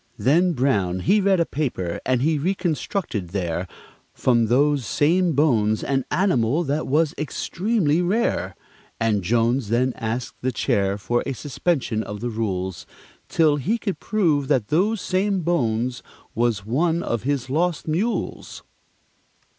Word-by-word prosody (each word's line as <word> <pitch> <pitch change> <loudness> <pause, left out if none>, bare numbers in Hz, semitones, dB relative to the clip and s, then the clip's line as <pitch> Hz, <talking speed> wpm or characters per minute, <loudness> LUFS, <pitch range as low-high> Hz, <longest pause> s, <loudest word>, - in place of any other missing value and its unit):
Then 170 - +3
Brown 100 - 0
he 205 - +3
read 195 -1 +3
a 170 - +3
paper, 120 - -3
and 130 -1 +2
he 155 0 +2
reconstructed 170 - -2
there, 90 -1 -3 0.5
From 120 -3 +2
those 140 +3 +2
same 170 +8 +2
bones, 115 -8 +2
an 135 -2 0
animal 150 - +2
that 150 +1 -2
was 150 +2 +2
extremely 170 +2 0
rare; 200 +7 0 0.4
And 110 -3 +1
Jones 115 +3 +1
then 125 +3 +1
asked 115 +1 -4
the 130 - 0
Chair 100 -4 0
for 120 +5 -1
a 135 - -1
suspension 135 -4 -1
of 105 -1 -6
the 120 +2 -3
rules, 95 -5 -3 0.4
Till 155 -3 +3
he 200 - 0
could 200 -4 -4
prove 160 -10 +1
that 130 -7 +1
those 200 +8 +2
same 190 +1 0
bones 125 -7 0 0.3
was 115 -4 0
one 160 +9 +1
of 115 -2 -2
his 140 -2 -1
lost 165 +5 -1
mules. 195 +10 -2
135 Hz, 140 wpm, -23 LUFS, 115-170 Hz, 0.5 s, Then